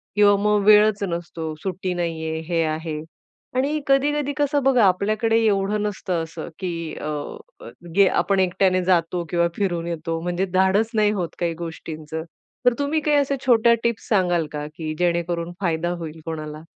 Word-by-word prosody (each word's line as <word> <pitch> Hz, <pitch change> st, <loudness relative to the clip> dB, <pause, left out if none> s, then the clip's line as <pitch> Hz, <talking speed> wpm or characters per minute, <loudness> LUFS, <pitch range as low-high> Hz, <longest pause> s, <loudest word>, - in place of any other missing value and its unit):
किंवा 205 Hz, -1 st, +6 dB
मग 210 Hz, -1 st, +3 dB
वेळच 210 Hz, 0 st, +6 dB
नसतो. 170 Hz, -3 st, -4 dB
सुट्टी 185 Hz, -1 st, -2 dB
नाहीये, 160 Hz, -2 st, -3 dB
हे 165 Hz, -1 st, +2 dB
आहे. 155 Hz, 0 st, -3 dB, 0.6 s
आणि 285 Hz, +4 st, 0 dB
कधी-कधी 285 Hz, +1 st, +2 dB
कसं 290 Hz, -1 st, +1 dB
बघा, 255 Hz, -4 st, +4 dB
आपल्याकडे 215 Hz, +4 st, +2 dB
एवढं 205 Hz, 0 st, +1 dB
नसतं 185 Hz, -5 st, -2 dB
असं 165 Hz, 0 st, -7 dB
की 185 Hz, -2 st, -2 dB, 0.3 s
अ, 150 Hz, -, -3 dB, 0.9 s
गे 200 Hz, -1 st, +6 dB
आपण 195 Hz, -1 st, +1 dB
एकट्याने 185 Hz, 0 st, +2 dB
जातो 175 Hz, -1 st, +1 dB
किंवा 170 Hz, 0 st, +2 dB
फिरून 175 Hz, -4 st, -1 dB
येतो. 165 Hz, 0 st, -3 dB
म्हणजे 175 Hz, +2 st, -1 dB
धाडस 190 Hz, +4 st, +3 dB
नाही 210 Hz, -1 st, +3 dB
होत 180 Hz, -5 st, -2 dB
काही 170 Hz, -1 st, 0 dB
गोष्टींचं. 160 Hz, -1 st, -6 dB, 0.4 s
तर 245 Hz, -, +6 dB
तुम्ही 285 Hz, +2 st, +1 dB
काही 300 Hz, -1 st, +2 dB
अशा 280 Hz, -1 st, +1 dB
छोट्या 235 Hz, -1 st, +5 dB
टिप्स 235 Hz, -1 st, -1 dB
सांगाल 175 Hz, -6 st, +2 dB
का 150 Hz, -1 st, -4 dB
की 155 Hz, -1 st, -4 dB
जेणेकरून 170 Hz, -1 st, 0 dB
फायदा 170 Hz, -1 st, 0 dB
होईल 160 Hz, -1 st, -7 dB
कोणाला? 155 Hz, -1 st, -6 dB
185 Hz, 155 wpm, -23 LUFS, 165-215 Hz, 0.9 s, किंवा